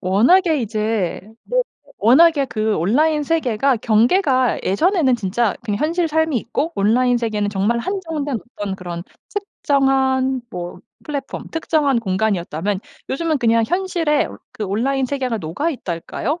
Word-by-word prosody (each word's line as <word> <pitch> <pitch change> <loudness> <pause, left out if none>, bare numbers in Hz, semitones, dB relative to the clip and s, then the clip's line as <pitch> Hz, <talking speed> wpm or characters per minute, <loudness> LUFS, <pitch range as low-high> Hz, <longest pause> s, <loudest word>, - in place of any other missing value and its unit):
워낙에 290 - +3
이제 215 -4 -1 0.2
네 - - +1 0.4
워낙에 280 +7 +5
그 215 -3 -1
온라인 300 - +2
세계가 275 -4 +1
경계가 250 - +2
예전에는 290 - +2
진짜 220 +1 0
그냥 205 -3 -2
현실 335 +3 +1
삶이 320 -2 +1
있고 275 +8 -2
온라인 245 +4 +3
세계는 215 -3 -1
정말 205 +4 0
한정된 315 - -3 0.2
어떤 200 -2 -3
그런 175 -2 -6 0.3
특정한 265 -8 +1
뭐 175 0 -6 0.2
플랫폼 280 -3 -5
특정한 305 -5 +1
공간이었다면 190 -3 -1 0.3
요즘은 315 +2 0
그냥 230 -2 +3
현실에 345 -3 0 0.2
그 215 - -4
온라인 255 +7 0
세계가 255 -4 -2
녹아 185 - -2
있달까요? 250 - -4
255 Hz, 310 characters per minute, -20 LUFS, 210-305 Hz, 0.4 s, 워낙에